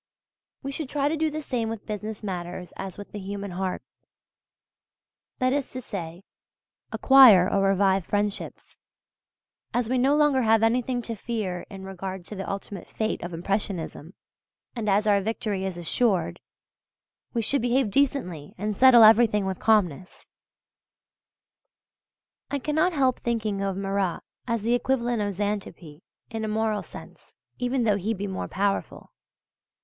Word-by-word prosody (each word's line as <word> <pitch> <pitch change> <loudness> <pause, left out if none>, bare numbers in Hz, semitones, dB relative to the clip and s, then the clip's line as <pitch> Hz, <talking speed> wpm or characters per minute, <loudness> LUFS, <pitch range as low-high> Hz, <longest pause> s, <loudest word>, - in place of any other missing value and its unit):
We 275 - -4
should 275 -1 -5
try 285 -1 0
to 320 - 0
do 315 0 0
the 305 0 -5
same 235 -5 -2
with 225 -2 -6
business 215 0 -5
matters 180 -2 -5
as 190 -2 -7
with 205 - -10
the 210 - -6
human 200 0 -5
heart 185 +1 -3 1.5
that 255 0 +1
is 285 -2 -1
to 255 - -4
say, 175 -5 -7 0.7
acquire 245 -10 +7
or 200 0 +1
revive 195 -2 +2
friendships{U}. 205 0 -3 1.0
As 240 -2 0
we 255 - +2
no 270 +3 +3
longer 295 -3 +3
have 225 -1 +3
anything 245 +2 +1
to 230 - -4
fear 210 -5 -4
in 195 -1 -9
regard 190 -1 -6
to 210 - -8
the 195 - -5
ultimate 200 -1 -6
fate 220 0 -2
of 175 - -5
Impressionism, 175 -2 -4 0.6
and 220 -3 -2
as 205 +2 +3
our 205 -2 +3
victory 205 -2 -2
is 190 -2 -4
assured, 190 +3 0 1.0
we 230 - +1
should 275 +4 +1
behave 245 -2 +1
decently 200 - -1
and 210 +2 -2
settle 250 0 +8
everything 215 -2 +6
with 190 -1 -3
calmness. 190 -6 0 2.2
I 285 - -1
cannot 310 +6 +1
help 260 -4 +2
thinking 220 -4 -2
of 195 -1 -2
Marat 195 -2 -1 0.3
as 230 -3 -1
the 235 +2 +1
equivalent 245 -2 0
of 205 -1 -2
Xanthippe 190 -6 -4 0.3
in 225 -1 -4
a - - -2
moral 215 -1 0
sense - - -13 0.2
(even 245 0 0
though 210 -3 +2
he 215 +4 -2
be 200 +1 -4
more 190 -2 -4
powerful). 200 +1 -2
210 Hz, 150 wpm, -26 LUFS, 195-245 Hz, 2.2 s, settle